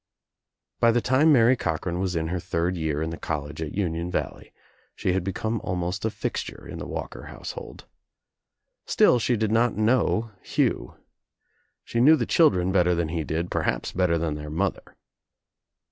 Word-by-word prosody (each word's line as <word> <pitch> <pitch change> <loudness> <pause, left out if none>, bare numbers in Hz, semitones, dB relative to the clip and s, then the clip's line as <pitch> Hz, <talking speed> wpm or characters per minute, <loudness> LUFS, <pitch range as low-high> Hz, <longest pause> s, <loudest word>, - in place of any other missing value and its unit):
By 115 - +5
the 120 - +2
time 130 +6 +4
Mary 125 -2 +6
Cochran 85 -3 -2
was 95 -1 -1
in 80 -1 -1
her 90 +1 -2
third 85 +2 -1
year 80 -2 -1
in 80 - -3
the 80 - -7
college 75 0 -4
at 75 -2 -4
Union 85 -3 -1
Valley - - -4 0.4
she 90 - 0
had 95 -1 0
become 110 +4 -2
almost 90 +2 -2
a - - +2
fixture - - -5
in - - -7
the - - -6
Walker - - -6
household. - - -8 1.0
Still 125 - +4
she 120 +1 +1
did 110 0 0
not 115 -1 +2
know 110 0 +2
Hugh. - - -1 0.9
She 115 - -1
knew 155 +5 +8
the - - -1
children 95 - +3
better 90 -2 +3
than 85 -2 -1
he 80 -1 -2
did, 80 +4 -3
perhaps - - -1
better 90 -2 +1
than 80 -2 -1
their 75 0 -6
mother. 90 +5 -3
90 Hz, 170 wpm, -25 LUFS, 80-110 Hz, 1.0 s, knew